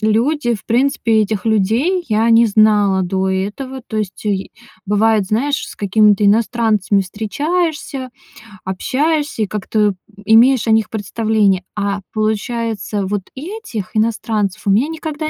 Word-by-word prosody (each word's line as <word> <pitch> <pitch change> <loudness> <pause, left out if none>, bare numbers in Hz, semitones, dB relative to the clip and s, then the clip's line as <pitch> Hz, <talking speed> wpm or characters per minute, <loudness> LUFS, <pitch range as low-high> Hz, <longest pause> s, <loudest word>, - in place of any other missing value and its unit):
Люди, 240 +4 +1
в 205 - -9
принципе 230 -2 +2
этих 210 -2 -3
людей 230 - +1
я 220 +1 +2
не 230 +1 +6
знала 205 -3 +3
до 190 +1 -1
этого. 210 +8 -4
То 220 - -6
есть 210 -2 -4
е 195 -2 -2 0.4
бывает, 210 +1 +2
знаешь, 265 +8 0
с - - -10
какими-то 210 +1 +3
иностранцами 215 -1 +2
встречаешься, 275 - -3 0.6
общаешься 285 - -1
и - - -2
как-то, 210 +1 0
э, 200 - -2 0.3
имеешь 235 +3 +5
о - - +3
них 220 -1 +2
представление. 210 -2 0
А 200 -1 -1
получается, 215 -1 -2
вот 205 +1 -2
этих 300 - -6
иностранцев 215 -2 -1
у - - +3
меня 230 +9 +3
никогда 315 -1 -4
220 Hz, 135 wpm, -17 LUFS, 205-250 Hz, 0.6 s, не